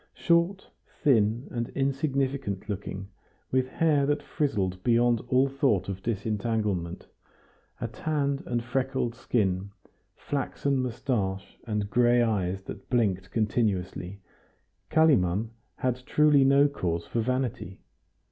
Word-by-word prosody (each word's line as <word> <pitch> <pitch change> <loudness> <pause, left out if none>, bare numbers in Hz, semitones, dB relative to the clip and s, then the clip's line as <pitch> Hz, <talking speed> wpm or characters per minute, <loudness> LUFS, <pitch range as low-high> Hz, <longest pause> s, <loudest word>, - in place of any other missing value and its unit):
Short, 170 +3 +1 0.4
thin, 115 -2 +3
and 120 -1 -3
insignificant 135 -6 -1
looking, 100 -1 -5 0.4
with 130 0 +2
hair 145 0 +2
that 145 0 0
frizzled 100 -11 -1
beyond 120 -1 +3
all 130 +1 +3
thought 130 -9 +1
of 95 -1 -5
disentanglement, 105 -4 -2 0.7
a - - -2
tanned 140 -3 -1
and 120 -1 -1
freckled 130 -1 -1
skin, 100 -5 -1 0.5
flaxen 140 0 -2
moustache, 110 -6 -2
and 105 -2 -2
gray 120 +1 +4
eyes 95 -4 -1
that - - -9
blinked 100 -6 +1
continuously, 100 -4 -1 0.7
Kalimann 115 - +3 0.2
had 125 -1 -1
truly 150 -2 +5
no 140 +1 +5
cause 85 -11 -2
for 115 - -1
vanity. 125 -6 -2
120 Hz, 110 wpm, -27 LUFS, 100-135 Hz, 0.7 s, truly